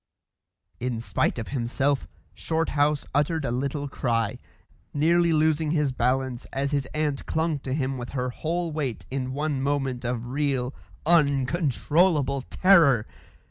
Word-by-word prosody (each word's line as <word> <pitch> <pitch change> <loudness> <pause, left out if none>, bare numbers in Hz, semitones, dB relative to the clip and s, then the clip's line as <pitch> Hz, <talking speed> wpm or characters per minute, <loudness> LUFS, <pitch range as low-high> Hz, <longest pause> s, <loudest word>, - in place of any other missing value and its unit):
In 125 -2 -2
spite 115 - 0
of 115 - -5
himself, 135 +2 0 0.3
Shorthouse 150 -3 0
uttered 150 +1 +1
a 120 - -1
little 140 +3 -2
cry, 115 -5 -1 0.6
nearly 170 +3 +3
losing 155 0 +2
his 150 -3 +1
balance 125 0 -1
as 140 +1 -2
his 140 -2 0
aunt 150 -2 -1
clung 160 -2 0
to 135 -1 -6
him 135 -1 -1
with 120 - -6
her 125 0 -1
whole 170 +5 -2
weight 140 -7 -3
in 130 -1 -2
one 145 0 -1
moment 135 -3 -1
of 120 -1 -2
real, 135 -1 -1 0.3
uncontrollable 145 0 +2
terror. 160 - +5
140 Hz, 135 wpm, -26 LUFS, 130-155 Hz, 0.6 s, terror